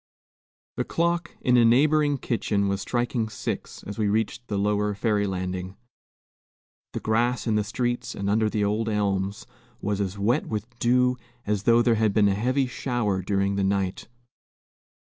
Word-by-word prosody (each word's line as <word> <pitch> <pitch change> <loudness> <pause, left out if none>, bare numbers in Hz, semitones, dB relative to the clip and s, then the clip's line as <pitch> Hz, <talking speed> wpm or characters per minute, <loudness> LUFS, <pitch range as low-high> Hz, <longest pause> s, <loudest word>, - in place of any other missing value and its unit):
The - - +1
clock 170 +1 -1
in 125 -1 +4
a 120 - +6
neighboring 145 +5 +4
kitchen 105 -5 0
was 100 0 -1
striking 120 -2 -1
six, - - -5
as 105 +2 -7
we 105 - +2
reached 110 +3 -1
the 100 - -2
lower 105 0 +1
ferry 105 -1 +1
landing. 95 0 -4 1.2
The - - -2
grass 120 +3 0
in 110 - +1
the 105 0 +2
streets 120 +3 -2
and 100 - -3
under 110 +1 +2
the 105 -1 0
old 110 +2 0
elms 100 -2 -1 0.3
was 100 0 -1
as 100 0 -3
wet 115 +9 +1
with 110 0 -3
dew 125 +1 +3 0.3
as 105 -1 -1
though 120 0 +5
there 120 - +4
had 110 -2 +2
been 105 -2 +5
a - - +2
heavy 130 +7 +1
shower 120 -6 -1
during 100 +1 0
the 100 - +1
night. 95 -1 -1
105 Hz, 165 wpm, -25 LUFS, 100-120 Hz, 1.2 s, a